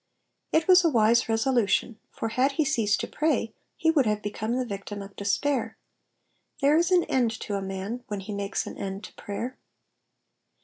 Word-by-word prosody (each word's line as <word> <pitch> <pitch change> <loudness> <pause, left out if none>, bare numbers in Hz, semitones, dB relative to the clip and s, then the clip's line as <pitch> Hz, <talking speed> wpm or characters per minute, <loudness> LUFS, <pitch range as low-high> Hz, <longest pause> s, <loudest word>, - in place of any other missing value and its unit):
''^ - - +6
It 320 - -11
was 370 0 +7
a 335 - +4
wise 230 -3 +3
resolution, 225 -1 +1
for 225 - -4
had 260 +5 +1
he 310 +2 +1
ceased 225 -7 +1
to - - -3
pray 285 -8 0 0.2
he 320 - +3
would 280 -7 +3
have 210 0 0
become 215 +3 -2
the 255 - -1
victim 205 -1 -6
of 195 0 -9
despair; 260 +8 -1 0.8
there 285 +1 +4
is 340 +2 +3
an 360 -2 +4
end 250 -3 +1
to 205 - -4
a 200 - -1
man 195 +5 -5
when 205 -4 -4
he 205 +2 -6
makes 200 0 -2
an - - -8
end 195 +1 -5
to - - -10
prayer. 240 +5 -6
230 Hz, 190 wpm, -27 LUFS, 205-275 Hz, 0.8 s, was